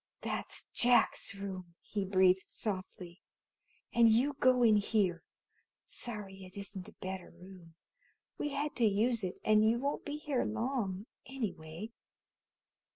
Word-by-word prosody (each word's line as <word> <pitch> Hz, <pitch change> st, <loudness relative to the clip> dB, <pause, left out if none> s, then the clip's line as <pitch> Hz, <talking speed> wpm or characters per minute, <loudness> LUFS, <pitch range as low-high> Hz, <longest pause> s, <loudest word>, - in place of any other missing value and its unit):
"That's -, -, -4 dB
Jack's 240 Hz, -4 st, +3 dB
room," 185 Hz, -3 st, -6 dB
he 205 Hz, -2 st, -3 dB
breathed 185 Hz, -1 st, +5 dB
softly, 185 Hz, -3 st, -6 dB, 0.7 s
"and 235 Hz, -1 st, +6 dB
you 250 Hz, +6 st, +3 dB
go 255 Hz, -1 st, +5 dB
in 220 Hz, -2 st, +6 dB
here. 200 Hz, -5 st, +1 dB, 0.6 s
Sorry 200 Hz, -5 st, -5 dB
it 185 Hz, +1 st, -3 dB
isn't 200 Hz, -1 st, -4 dB
a -, -, -17 dB
better 190 Hz, -1 st, -6 dB
room. 175 Hz, -2 st, -14 dB, 0.6 s
We 295 Hz, -, -1 dB
had 290 Hz, +1 st, -2 dB
to 240 Hz, -, +4 dB
use 220 Hz, +2 st, +2 dB
it, 185 Hz, -1 st, -3 dB
and 215 Hz, 0 st, +5 dB
you 225 Hz, +2 st, +4 dB
won't 280 Hz, +4 st, -2 dB
be 295 Hz, 0 st, -4 dB
here 295 Hz, -4 st, -1 dB
long, 220 Hz, -4 st, -2 dB, 0.2 s
anyway." 205 Hz, -6 st, -5 dB
210 Hz, 135 wpm, -33 LUFS, 185-240 Hz, 0.7 s, and